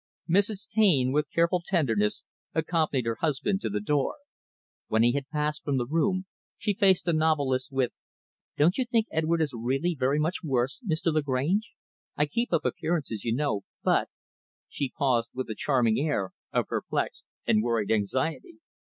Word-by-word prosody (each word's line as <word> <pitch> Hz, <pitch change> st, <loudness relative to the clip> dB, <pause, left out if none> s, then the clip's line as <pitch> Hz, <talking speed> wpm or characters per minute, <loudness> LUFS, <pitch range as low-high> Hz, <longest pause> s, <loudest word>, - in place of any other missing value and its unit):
Mrs. 200 Hz, +3 st, +1 dB
Taine, 185 Hz, -, +3 dB
with 150 Hz, +2 st, +1 dB
careful 170 Hz, +2 st, +2 dB
tenderness, 115 Hz, -, +1 dB, 0.3 s
accompanied 155 Hz, -5 st, +1 dB
her 115 Hz, -1 st, -1 dB
husband 165 Hz, +6 st, 0 dB
to -, -, -2 dB
the 105 Hz, 0 st, -1 dB
door. 140 Hz, -, 0 dB, 0.7 s
When 110 Hz, +1 st, +3 dB
he 120 Hz, -, +5 dB
had 140 Hz, +1 st, -3 dB
passed 150 Hz, -1 st, -2 dB
from 140 Hz, -2 st, 0 dB
the 120 Hz, -, 0 dB
room, 165 Hz, +7 st, 0 dB, 0.3 s
she 205 Hz, -1 st, 0 dB
faced 190 Hz, -2 st, +3 dB
the 170 Hz, -, +2 dB
novelist, 145 Hz, -5 st, +1 dB
with 135 Hz, -2 st, +1 dB, 0.7 s
"Don't 170 Hz, -, +3 dB
you 260 Hz, -, +2 dB
think 230 Hz, -2 st, +1 dB
Edward 160 Hz, +1 st, +1 dB
is 145 Hz, -4 st, -3 dB
really 135 Hz, +9 st, 0 dB
very 135 Hz, -1 st, +1 dB
much 160 Hz, +4 st, 0 dB
worse, 130 Hz, -, 0 dB
Mr. 165 Hz, -4 st, 0 dB
Lagrange? 155 Hz, +8 st, 0 dB, 0.4 s
I 150 Hz, -, +3 dB
keep 235 Hz, +12 st, -2 dB
up 165 Hz, -, +1 dB
appearances, 155 Hz, -, -2 dB
you 115 Hz, -1 st, +1 dB
know, 140 Hz, -7 st, 0 dB, 0.2 s
but -, -, +2 dB, 0.3 s
" -, -, -82 dB
she 140 Hz, -, -3 dB
paused 125 Hz, -4 st, +2 dB
with 130 Hz, -3 st, -3 dB
a -, -, -4 dB
charming 120 Hz, -5 st, +2 dB
air 140 Hz, -11 st, 0 dB, 0.2 s
of -, -, +1 dB
perplexed -, -, -3 dB, 0.2 s
and 105 Hz, -, +3 dB
worried 115 Hz, -3 st, 0 dB
anxiety. 130 Hz, -, -1 dB
150 Hz, 170 wpm, -27 LUFS, 125-170 Hz, 0.7 s, he